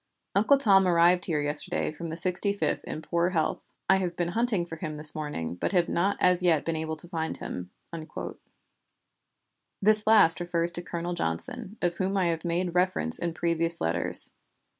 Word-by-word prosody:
Uncle 220 +8 +4
Tom 195 -7 +4
arrived 175 +1 +3
here 155 -4 -1
yesterday 145 +1 -1
from 165 +2 -7
the 160 - -5
Sixty 185 +3 +1
fifth 200 - -2
in 155 - -6
poor 170 +1 0
health. 165 -4 -1 0.2
I 190 - +4
have 180 -2 -3
been 175 -1 -1
hunting 220 -2 0
for 165 -1 -9
him 155 -1 -6
this 150 0 +4
morning, 150 - -5
but 90 - -3
have 175 -2 +2
not 195 +4 0
as 180 0 +3
yet 165 -4 +2
been 165 - -2
able 160 0 -3
to 155 +2 -5
find 160 -2 -4
him." 90 0 -7 2.1
This 215 +1 +4
last 205 -7 +7
refers 175 -1 0
to 175 - -4
Colonel 175 0 -5
Johnson, 225 +4 -4
of 175 -1 0
whom 195 +1 -1
I 185 - +1
have 160 - -7
made 175 0 -2
reference 180 - 0
in 170 -1 -3
previous 170 0 0
letters. 80 +1 +2
175 Hz, 180 wpm, -27 LUFS, 160-190 Hz, 2.1 s, last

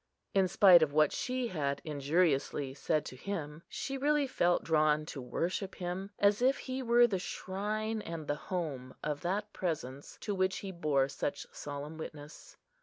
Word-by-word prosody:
In 195 -1 +4
spite 180 -1 +7
of 150 -2 +2
what 155 0 +4
she 255 -1 -2
had 140 -6 -1
injuriously 145 -2 +1
said 150 +2 0
to - - -7
him, 150 -1 -5
she 270 -1 -4
really 295 +1 +3
felt 175 -9 +2
drawn 155 -1 +3
to 145 -3 -6
worship 175 +10 -2
him, 180 +2 -4
as 205 +2 +3
if 265 +2 +4
he 260 0 -4
were 240 -1 +6
the 200 -6 0
shrine 215 +5 -3
and 165 -4 -6
the 145 - 0 0.2
home 145 -8 -3
of 150 -1 -2
that 205 +4 -2
Presence 145 -6 -4
to 205 - -2
which 185 0 +1
he 195 - -4
bore 150 -6 +1
such 140 +1 -3
solemn 145 +2 -6
witness. 150 - -9
170 Hz, 170 wpm, -32 LUFS, 145-205 Hz, 0.2 s, spite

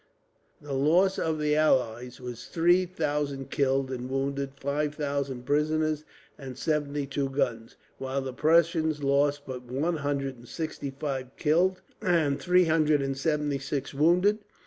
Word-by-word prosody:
The 145 -1 -5
loss 170 +8 +3
of 160 -1 0
the 150 0 +1
allies 125 -5 +1
was 125 -2 -7
three 175 +2 +3
thousand 145 -5 -2
killed 135 -2 +1
and 125 0 -4
wounded, 135 0 -2
five 145 +2 -1
thousand 140 -4 -3
prisoners, 155 +1 +1 0.3
and 130 -3 -8
seventy 145 -1 -1
two 135 0 -2
guns; 125 -5 -2 0.2
while 135 +1 -2
the 130 -1 -5
Prussians 160 0 +2
lost 140 +1 +2
but 130 -1 -6
one 140 +7 -1
hundred 140 -2 -2
and 120 +1 -15
sixty 155 -2 -4
five 135 -1 -4
killed, 175 +5 +2 0.2
and 165 -8 +2
three 180 0 +4
hundred 155 -3 +3
and 135 0 -2
seventy 145 0 0
six 140 0 -4
wounded. 180 +9 +3
145 Hz, 145 wpm, -28 LUFS, 135-155 Hz, 0.3 s, three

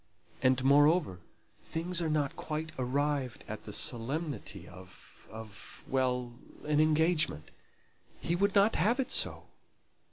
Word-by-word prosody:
And, 130 0 +3
moreover, 145 - +4 0.4
things 170 +2 -2
are 165 - 0
not 150 -3 0
quite 155 0 -4
arrived 135 -1 -1
at 110 0 -7
the 105 - -7
solemnity 115 - -2
of 95 0 -14
of 110 -2 -9
well 125 -2 0 0.3
an 150 0 +2
engagement. 155 - +2 0.7
He 170 - -1
would 200 +3 +1
not 205 +2 +4
have 220 - +2
it 265 -1 -1
so. - - +2
145 Hz, 125 wpm, -31 LUFS, 125-160 Hz, 0.7 s, moreover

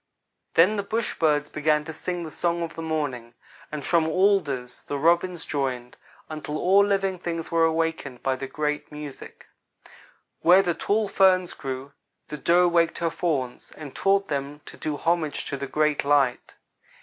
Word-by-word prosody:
"Then 185 +6 +5
the - - +1
bush 220 +3 -3
birds 150 -2 +2
began 150 0 +1
to 160 - -6
sing 175 +2 -4
the 160 - -7
song 170 +1 -1
of 165 - -5
the 165 - -7
morning, 140 -7 -3 0.4
and 150 -2 -5
from 165 -2 +2
alders 155 -10 +1
the 145 - -4
Robins 170 +3 +2
joined, 130 -4 -3 0.3
until 155 -1 -5
all 195 +4 +5
live 195 -2 0
things 165 -2 -4
were 165 -1 +4
awakened 160 -5 -2
by 135 -1 +1
the 135 +1 -6
great 150 0 -3
music. 150 -2 -9 0.9
Where 180 +3 +6
the 175 -2 0
tall 210 +5 0
ferns 185 -2 +3
grew, 135 0 -6 0.4
the 150 - -5
Doe 175 +4 +4
waked 170 -1 +2
her 170 -1 -1
Fawns, 135 -9 -2
and 150 -4 -10
taught 195 0 +2
them 145 0 -4
to - - -11
do 150 -2 -4
homage 165 -2 -1
to - - -2
the 140 0 -5
Great 150 +1 +1
Light. 140 -3 +1
160 Hz, 170 wpm, -25 LUFS, 145-175 Hz, 0.9 s, Where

